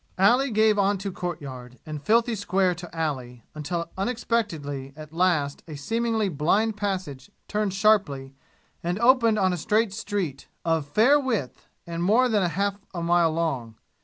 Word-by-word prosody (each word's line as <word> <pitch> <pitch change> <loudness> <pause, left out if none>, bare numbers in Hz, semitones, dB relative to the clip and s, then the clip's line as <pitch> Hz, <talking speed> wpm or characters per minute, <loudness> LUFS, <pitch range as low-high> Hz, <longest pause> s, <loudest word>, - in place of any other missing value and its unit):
Alley 245 +9 +4
gave 215 -2 +3
on 200 0 +2
to 195 +1 -4
courtyard, 135 -9 -6
and 155 -2 -6
filthy 230 +8 +2
square 190 -3 +1
to 175 0 -9
alley, 130 -7 -3
until 160 +3 -4
unexpectedly 190 - -2
at 155 0 -11
last 165 -5 +1
a 155 - -7
seemingly 225 +7 0
blind 195 +7 +1
passage 185 -10 -4 0.2
turned 210 -2 -1
sharply 195 -11 +2 0.5
and 175 +2 -2
opened 235 -1 +4
on 190 -3 +2
a - - -2
straight 210 +4 +1
street, 190 -10 -3 0.2
of 165 -3 +1
fair 230 - +4
width, 225 - -3 0.2
and 170 0 -4
more 225 +8 +4
than 215 -4 +2
half 200 +4 -1 0.2
a 170 - -3
mile 170 -1 +3
long. 140 -9 -2
185 Hz, 155 wpm, -25 LUFS, 150-215 Hz, 0.5 s, Alley